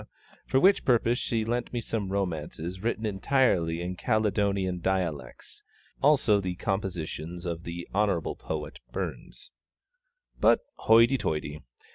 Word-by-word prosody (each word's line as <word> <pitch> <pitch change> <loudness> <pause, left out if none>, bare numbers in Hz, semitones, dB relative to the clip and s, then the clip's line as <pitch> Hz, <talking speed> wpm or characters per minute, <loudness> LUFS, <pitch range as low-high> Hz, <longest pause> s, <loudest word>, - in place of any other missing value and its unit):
for 130 - +3
which 195 +6 +5
purpose 120 -1 +2
she 110 -2 -1
lent 120 +1 -2
me 120 - -2
some 105 -4 -3
romances 90 -1 -3
written 110 0 -1
entirely 95 -6 +1
in 90 +1 -4
Caledonian 100 -2 0
dialects, 85 -8 -3 0.4
also 135 -8 +4
the 90 -2 -3
compositions 90 -3 -4
of 85 -1 -4 0.3
Hon. 105 +1 +1
Poet - - -6
BURNS. - - -6 0.9
But - - +5
hoity 115 +4 +5
toity! 75 -1 -3
95 Hz, 115 wpm, -28 LUFS, 85-115 Hz, 0.9 s, which